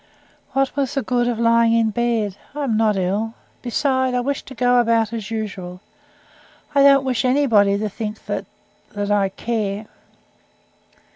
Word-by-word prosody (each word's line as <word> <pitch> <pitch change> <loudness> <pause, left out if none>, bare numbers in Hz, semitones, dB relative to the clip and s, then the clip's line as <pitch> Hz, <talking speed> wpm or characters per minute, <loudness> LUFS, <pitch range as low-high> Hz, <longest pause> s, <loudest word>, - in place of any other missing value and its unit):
"What 270 0 0
was 280 0 -1
the 275 - 0
good 245 -1 0
of 240 -2 -1
lying 230 0 +3
in 225 -1 +2
bed? 225 -3 -1 0.2
I 295 - -2
am 240 -6 0
not 215 -2 +2
ill. 205 +5 -1 0.3
Besides, 260 +1 0
I - - +2
wish 280 +2 -2
to 265 - -12
go 245 +1 +3
about 230 -1 +2
as 220 -4 -5
usual. 195 -5 -5 0.9
I 280 - +4
don't 275 -1 +6
wish 255 -2 0
anybody 235 -7 +3
to 215 +1 -2
think 215 +1 -6
that - - -4 0.5
that 205 0 -2
I 200 -2 +2
care." 215 -1 -3
230 Hz, 160 wpm, -21 LUFS, 210-255 Hz, 0.9 s, don't